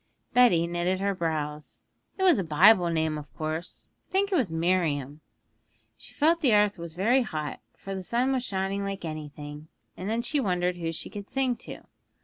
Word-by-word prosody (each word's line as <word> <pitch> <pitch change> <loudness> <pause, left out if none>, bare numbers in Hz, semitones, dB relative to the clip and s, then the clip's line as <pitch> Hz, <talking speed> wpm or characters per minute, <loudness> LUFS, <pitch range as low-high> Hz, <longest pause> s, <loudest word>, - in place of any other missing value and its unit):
Betty 230 -10 +5
knitted 175 +2 -1
her 200 +1 0
brows. 150 -4 -4 0.3
'It 380 - -1
was 355 - +5
a - - 0
Bible 175 +4 +5
name, 160 -2 0
of 150 - -12
course; 155 +2 -4 0.2
I - - -38
think 395 +1 +1
it - - +2
was 245 - +1
Miriam. 160 -4 0 0.7
She - - -10
felt 330 +3 +3
the 250 -8 +4
earth 205 -2 +3
was 170 -1 -8
very 235 +9 +3
hot, 155 -10 -4 0.2
for 195 - -7
the 190 - -4
sun 240 +7 0
was 260 -2 0
shining 195 -1 -2
like 195 -2 -4
anything, 150 -1 -7 0.3
and 185 +3 -5
then 230 +2 0
she 290 +4 0
wondered 180 -6 0
who 165 -1 -2
she 165 - -6
could 205 -2 -8
sing 265 -2 0
to. - - -9
185 Hz, 190 wpm, -27 LUFS, 160-230 Hz, 0.7 s, Betty